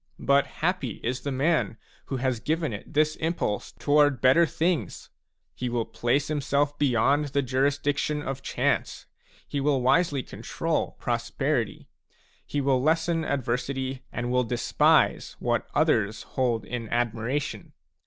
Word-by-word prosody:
But 140 0 +4
happy 165 - -2
is 125 +2 -2
the 140 - -3
man 140 -2 +1 0.3
who 135 - -3
has 130 -2 0
given 155 0 -1
it 105 - -8
this 155 +1 +2
impulse 160 -10 -2
toward 145 -3 +3
better 135 +7 +5
things! 165 +1 -2 0.4
He 125 - -3
will 120 -1 -1
place 130 +4 0
himself 145 -1 0
beyond 140 +2 +3
the 140 0 0
jurisdiction 145 +3 0
of 135 -1 -4
chance; - - -1 0.4
he 145 - -2
will 135 -2 +1
wisely 140 0 +3
control - - -3
prosperity; - - -1 0.6
he 145 - -1
will 135 -2 +2
lessen 165 +2 +1
adversity, 130 -1 -2
and 120 0 -3
will 125 0 +3
despise 120 +1 +2
what - - -1
others 110 +1 +2
hold 120 -4 -1
in 115 -2 -5
admiration. 120 +3 -2
135 Hz, 135 wpm, -26 LUFS, 125-145 Hz, 0.6 s, better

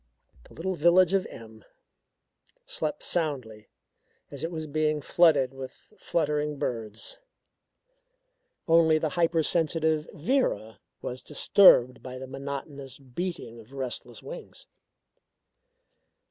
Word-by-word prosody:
The - - -17
little 190 +4 -2
village 175 +2 +4
of 195 -1 +1
M 110 -1 -12 1.0
slept 150 -2 -3
soundly 130 -11 -2 0.6
as 140 0 -6
it 165 - -1
was 160 -2 -5
being 155 0 0
flooded 145 -4 +3
with 135 -1 -8 0.2
fluttering 150 -5 -1
birds. 110 -4 -4 1.5
Only 165 -1 +5
the 155 0 -1
hypersensitive 160 -2 +1
Vera 150 - -1 0.2
was 125 +1 -5
disturbed 140 -5 +5
by 130 0 -8
the 130 - -7
monotonous 135 0 -7
beating 135 -3 -6
of 115 +4 -16
restless 130 -3 -5
wings. - - -10
150 Hz, 105 wpm, -27 LUFS, 130-165 Hz, 1.5 s, Only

